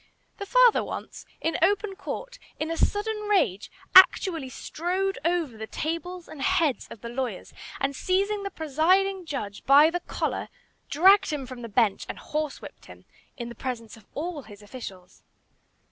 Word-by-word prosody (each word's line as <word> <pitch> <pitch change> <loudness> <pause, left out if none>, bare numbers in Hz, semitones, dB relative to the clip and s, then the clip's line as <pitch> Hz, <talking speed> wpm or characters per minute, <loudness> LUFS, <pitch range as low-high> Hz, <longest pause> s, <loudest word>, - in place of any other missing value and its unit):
The 400 - -6
father - - +5
once, - - -7
in 325 - -1
open 400 +3 +2
court, - - -7 0.2
in 315 +1 -2
a - - -1
sudden 425 +4 -1
rage, 215 - +1 0.2
actually 345 -6 +6
strode 370 +8 -2
over 335 -7 0
the 220 0 -7
tables 335 +5 -4
and 290 - -10
heads 335 -6 +1
of 220 - -11
the 235 - -6
lawyers, 255 +1 -4 0.3
and 275 0 -1
seizing 400 +6 0
the 400 - -4
presiding 360 +5 +1
judge 205 -9 -5
by 290 +4 +7
the 355 - -1
collar, - - -3 0.4
dragged 380 +7 +5
him 295 -4 -3
from 255 -1 -9
the 230 - -7
bench 215 -2 +1
and - - -5
horsewhipped 305 -1 -5
him - - -14 0.3
in 235 -2 -5
the - - -8
presence 235 -4 -5
of 220 -3 -19
all 320 0 -4
his 210 -4 -14
officials. 195 -5 -10
320 Hz, 160 wpm, -26 LUFS, 255-380 Hz, 0.4 s, by